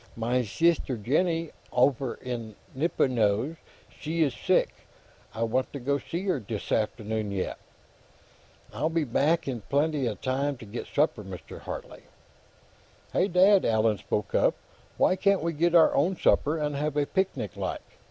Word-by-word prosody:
"Mein 120 +2 0
sister, 150 +2 +1
Jennie, 165 - 0 0.2
offer 130 0 +2
in 115 -4 -6 0.2
Nippenose, 130 -2 +1 0.3
she 160 +2 -2
iss 140 -5 0
sick; - - +1 0.6
I 115 +1 0
vant 130 +3 -1
to 140 - -4
go 140 +3 0
see 170 +6 -5
her, 185 -7 0
dis 110 -2 -6
afternoon, 110 0 -1
yet. 95 -2 -3 1.1
I'll 140 +9 0
be 165 -1 0
back 150 +6 +1
in 125 -4 -3
blenty 145 -2 +1
time 140 +2 -1
to 120 - -11
get 110 +3 -6
supper, 145 -7 +1
Mr. 95 -2 -9
Hartley." - - -8 1.1
"Hey, 185 - +3
Dad!" 190 +2 +5
Allan 110 -2 +2
spoke 105 -1 -3
up. - - +3 0.4
"Why - - +4
can't 200 -1 +2
we 170 0 -1
get 170 +3 +2
our 165 - +6
own 175 +7 +2
supper, 155 -2 +2
and 150 -2 -2
have 150 +1 -2
a 145 - +2
picnic, 190 +4 -2
like? - - -3
140 Hz, 150 wpm, -27 LUFS, 115-165 Hz, 1.1 s, our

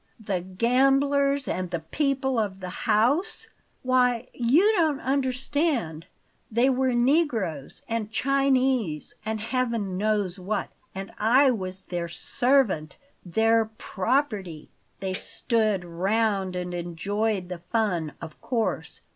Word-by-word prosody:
The 190 -3 -1
gamblers 275 +8 +2
and 185 -1 -2
the 170 -2 -3
people 265 - 0
of 200 -3 -2
the 185 +7 -7
house? 255 - +2 0.3
Why, 250 -1 +2
you 290 - +4
don't 315 -6 +2
understand! 265 - -1 0.4
They 240 +4 +3
were 260 -1 +1
negroes 240 - 0
and 225 -2 -2
Chinese 260 - +1
and 220 0 -2
Heaven 230 -4 -1
knows 205 -3 0
what; 195 +3 -2 0.3
and 195 0 -6
I 255 +5 +5
was 190 -4 -4
their 175 -2 -4
servant 220 - +1 0.3
THEIR 225 +5 +3
PROPERTY. 205 - -1 0.3
They 190 -1 -2
stood 215 -2 0
round 195 +2 0
and 180 0 -4
enjoyed 185 +4 -2
the 180 -2 -5
fun, 180 -9 0
of 160 -2 -9
course. 235 -3 -2
225 Hz, 115 wpm, -26 LUFS, 185-260 Hz, 0.4 s, I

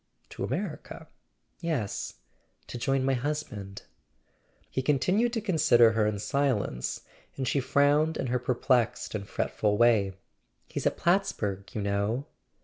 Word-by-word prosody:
"To - - -6
America?" - - -4 0.5
"Yes; 155 - -2 0.5
to 120 - -7
join 135 +2 +1
my 135 - +2
husband." 125 -8 -4 0.8
He 130 - -2
continued 180 - +2
to 225 - -1
consider 155 - +5
her 110 -1 +2
in 105 -1 -1
silence, 110 - -1 0.4
and 130 -2 -2
she 140 - +2
frowned 145 +4 +3
in - - -2
her 125 0 0
perplexed 125 -1 +1
and 100 -2 -5
fretful 105 -1 0
way. 110 -5 +4 0.5
"He's - - -2
at - - -1
Plattsburg, 105 - 0
you 105 - -1
know." 100 +6 0
125 Hz, 135 wpm, -28 LUFS, 105-145 Hz, 0.8 s, consider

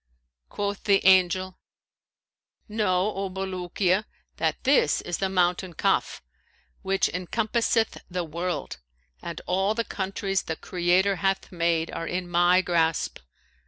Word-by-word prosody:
Quoth 205 0 -3
the 200 -2 +3
Angel, 185 0 +4 1.1
'Know, 210 -2 +1
O 195 0 -3
Bulukiya, 185 +1 -1 0.3
that - - -1
this 265 - +3
is 175 - -4
the 195 - 0
mountain 180 -1 +1
Kaf, - - 0 0.6
which 195 0 +1
encompasseth 225 +4 0
the 180 0 -2
world; 170 - -4 0.4
and 170 -2 -6
all 190 +4 +1
the 230 - 0
countries 195 0 -2
the 160 - -4
Creator 180 +3 +1
hath 195 +2 -1
made 170 -2 0
are 165 - -4
in 180 0 -3
my 175 +1 +4
grasp. 165 -3 0
185 Hz, 125 wpm, -26 LUFS, 175-195 Hz, 1.1 s, Angel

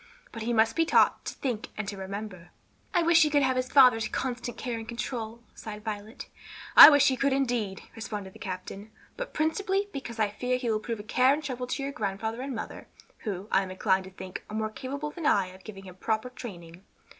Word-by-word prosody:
But 225 - -7
he 230 +2 -1
must 225 -1 +3
be 330 - +3
taught 325 - +3
to - - -5
think 240 -5 -3
and 215 -1 -3
to 205 - -4
remember." 195 -2 -7 0.4
"I 350 -3 +2
wish 335 0 +5
he 305 - +5
could 290 -1 +3
have 260 -1 +2
his 255 0 -1
father's 250 -5 +6
constant 245 -2 -4
care 245 -3 -3
and 225 - -9
control," 235 -1 -5
sighed 210 -1 -8
Violet. 215 +1 -6 0.5
"I - - +14
wish 285 -2 +5
he 260 - 0
could 275 +1 +1
indeed!" 240 -8 -1
responded 210 -4 -6
the - - -15
captain; 195 +2 -7 0.3
"but - - -5
principally 385 +6 0
because 240 -4 -6
I 215 -2 +2
fear 250 +4 -1
he 245 -2 -1
will 215 - +1
prove 230 0 -4
a - - -7
care 255 +5 +3
and 310 - -7
trouble 250 -3 -4
to 275 - -3
your 275 - -3
grandfather 220 +1 -3
and 270 -1 -4
mother, 220 - -7 0.3
who, 200 -2 -5
I 190 - +4
am 190 - -5
inclined 190 0 +1
to - - -9
think, 185 -1 -8
are 210 - -6
more 215 0 -2
capable 280 +6 -5
than 320 -2 -3
I 195 -2 +3
of 190 - -16
giving 195 -3 -10
him 185 -1 -12
proper 220 +5 -2
training. 180 -8 -10
225 Hz, 225 wpm, -28 LUFS, 205-265 Hz, 0.5 s, I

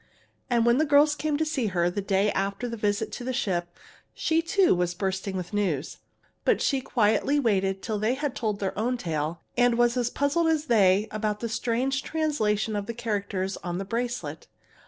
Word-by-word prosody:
And 235 -2 +2
when 235 +3 +4
the 310 - +3
girls 295 0 +5
came 305 -1 -1
to 315 - 0
see 290 -7 -1
her, 175 -3 +1
the 180 +3 -2
day 200 +1 +1
after 195 +5 -2
the 230 - -4
visit 205 -2 -1
to - - -6
the 255 - -2
ship, 175 -9 -2 0.4
she 325 0 +1
too 365 +3 +3
was 175 -1 0
bursting 190 0 -2
with 180 +3 -6
news. 175 -9 -1 0.5
But - - +3
she 275 -2 +1
quietly 245 +5 +2
waited 195 -6 +1
till 215 -3 -2
they 220 +5 +1
had 285 -1 -3
told 215 -5 -2
their 195 -2 -2
own 245 +4 0
tale, 160 -3 -3
and 245 -1 +3
was 240 0 +3
as 240 -1 +1
puzzled 285 +6 +1
as 315 -2 +1
they 205 -5 +4
about 215 -1 -2
the 230 - -3
strange 250 +4 0
translation 225 -11 0
of 205 -1 -3
the 235 - -4
characters 200 -4 -2
on 175 -1 -4
the 195 - -4
bracelet. 240 +4 -4
220 Hz, 200 wpm, -26 LUFS, 195-255 Hz, 0.5 s, girls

